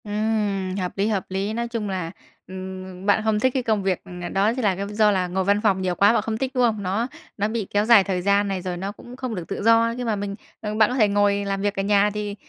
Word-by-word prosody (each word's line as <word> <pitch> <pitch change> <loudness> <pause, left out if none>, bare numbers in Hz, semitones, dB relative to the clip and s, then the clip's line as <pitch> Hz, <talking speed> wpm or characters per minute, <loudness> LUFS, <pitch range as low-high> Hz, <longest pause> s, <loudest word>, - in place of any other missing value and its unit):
Ừm, 205 -3 -1
hợp 185 -2 -2
lý, 200 +2 +1
hợp 205 -4 -1
lý. 195 +3 -2
Nói 235 +1 -2
chung 230 -3 -3
là, 180 -4 -3 0.4
ừm, 185 0 -8
bạn 205 +1 +3
không 215 -1 +1
thích 260 +3 +2
cái 260 - -1
công 215 -4 0
việc, 190 -2 0 0.2
ờ, 175 - -4
đó 200 +3 +2
thì 255 - -3
là 205 -4 +2 0.2
do 210 0 +3
là 185 -2 0
ngồi 190 +2 -1
văn 200 +2 +2
phòng 200 -4 +2
nhiều 180 -1 -1
quá, 200 +4 +5
bạn 230 - +2
không 220 +1 -3
thích, 265 +2 -2
đúng 250 -2 +2
không? 215 -4 +1
Nó 200 +6 -1 0.3
nó 205 0 +1
bị 220 -3 -3
kéo 205 +1 +1
dài 225 -3 +7
thời 185 -2 -2
gian 200 +2 +2
này, 195 -2 -2
rồi 180 -1 -4
nó 195 +3 -4
cũng 240 +4 -12
không 255 -3 -4
được 175 -3 -6
tự - - -4
do. 230 +1 +4
Nhưng 245 -1 -3
mà 220 - +1
mình 200 0 -4 0.3
ờ, 210 -1 -3
bạn 215 -1 +4
có 250 - -2
thể 220 -5 +4
ngồi 200 0 +2
làm 195 0 -2
việc 205 0 -1
ở - - 0
nhà 205 0 +3
thì, 210 -1 -4
205 Hz, 285 wpm, -23 LUFS, 195-220 Hz, 0.4 s, dài